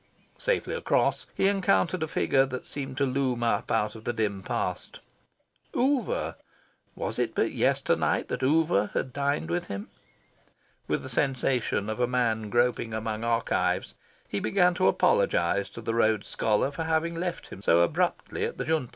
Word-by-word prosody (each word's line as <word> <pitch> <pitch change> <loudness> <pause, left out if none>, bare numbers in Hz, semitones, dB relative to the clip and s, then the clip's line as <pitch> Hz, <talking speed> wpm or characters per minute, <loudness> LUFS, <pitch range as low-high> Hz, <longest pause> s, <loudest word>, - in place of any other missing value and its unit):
Safely - - 0
across, 480 - +1
he 195 - +3
encountered 185 - +2
a 160 - 0
figure 135 -3 +2
that 130 -1 -6
seemed 135 -2 -5
to 140 - +2
loom 130 -2 0
up 115 -3 0
out 105 -1 +1
of 110 - -10
the - - -1
dim 105 -4 -1
past. - - -3 0.8
Oover! 260 -3 0 0.6
Was - - -4
it - - -1
but - - +1
yesternight - - +1
that - - -3
Oover 140 -7 +3 0.3
dined 140 - -1
with 85 - -1
him? 100 +1 -6 1.0
With - - -1
the - - -6
sensation 130 -6 0
of 110 +2 -3
a 125 - +2
man 115 -4 0
groping 120 -1 +1
among 110 0 -3
archives, 115 0 0 0.3
he 100 - -2
began 180 - +3
to 165 - +2
apologise 95 0 +2
to 115 - -9
the 115 0 -2
Rhodes 110 -3 +2
Scholar 110 +5 +1
for 160 +3 -4
having 160 +1 0
left 175 +1 -4
him 95 - -10
so 85 -3 +4
abruptly 85 - 0
at - - -3
the - - -3
Junta. 155 -6 0
120 Hz, 165 wpm, -27 LUFS, 110-145 Hz, 1.0 s, so